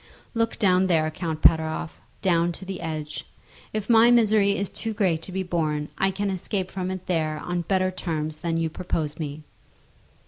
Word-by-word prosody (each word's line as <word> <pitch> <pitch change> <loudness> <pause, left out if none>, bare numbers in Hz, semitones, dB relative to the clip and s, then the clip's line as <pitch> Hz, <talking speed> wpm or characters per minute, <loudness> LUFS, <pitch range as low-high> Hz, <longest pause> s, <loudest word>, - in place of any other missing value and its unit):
"Look 230 -1 0
down 185 -2 +4
there, 160 -3 +2
Count 160 -1 -4
Pateroff; 160 +1 +3 0.2
down 175 -2 +3
to 190 - -10
the 190 -2 -5
edge. 155 -2 -5 0.4
If 215 -1 -3
my 230 0 +7
misery 215 -4 +4
is 200 - -1
too 225 -1 -4
great 180 -6 +1
to 185 - -7
be 190 +1 -2
borne, 155 -4 -1
I 195 - +2
can 200 +1 -1
escape 190 0 -3
from 185 -1 -3
it 185 -1 -5
there 155 -3 0
on 175 +3 -2
better 185 +1 +1
terms 155 -4 -3
than 165 0 -1
you 165 0 +1
propose 160 -2 -2
to - - -8
me." 150 0 -5
180 Hz, 185 wpm, -25 LUFS, 160-195 Hz, 0.4 s, my